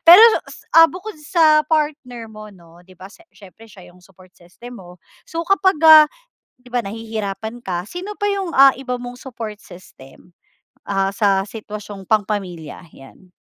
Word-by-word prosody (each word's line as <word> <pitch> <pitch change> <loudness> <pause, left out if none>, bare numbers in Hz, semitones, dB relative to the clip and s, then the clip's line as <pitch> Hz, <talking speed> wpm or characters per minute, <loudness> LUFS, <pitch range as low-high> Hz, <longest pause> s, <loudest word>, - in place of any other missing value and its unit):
pero 370 +7 +10 0.5
ah, 330 0 +7
bukod 375 +5 -9
sa 310 0 +3
partner 295 -7 -2
mo 215 -1 -12
'no, 170 -3 -19
'di 185 +1 -20
ba 190 +4 -13
sa - - -19 0.2
siyempre 215 +3 -17
siya 185 -4 -16
yung 180 - -22
support 185 0 -21
system 235 +8 -14
mo. 180 -1 -14 0.3
So, 330 +1 -4
kapag, 385 0 +2
ah, 310 -1 +9 0.5
'di 250 - -21
ba 245 -1 -2
nahihirapan 220 +1 -6
ka, 180 +1 -4
sino 385 - -8
pa 410 - 0
yung, 395 -3 -2
ah, 270 -2 +5
iba 250 -2 -5
mong 245 0 -8
support 235 -4 -8
system? 175 -1 -17 0.5
Ah, 195 0 -2
sa 195 -2 +1
sitwasyong 210 -2 -9
pang 210 +1 0
pamilya, 180 -8 -6
'yan? 155 +7 -18
220 Hz, 165 wpm, -19 LUFS, 190-300 Hz, 0.5 s, pero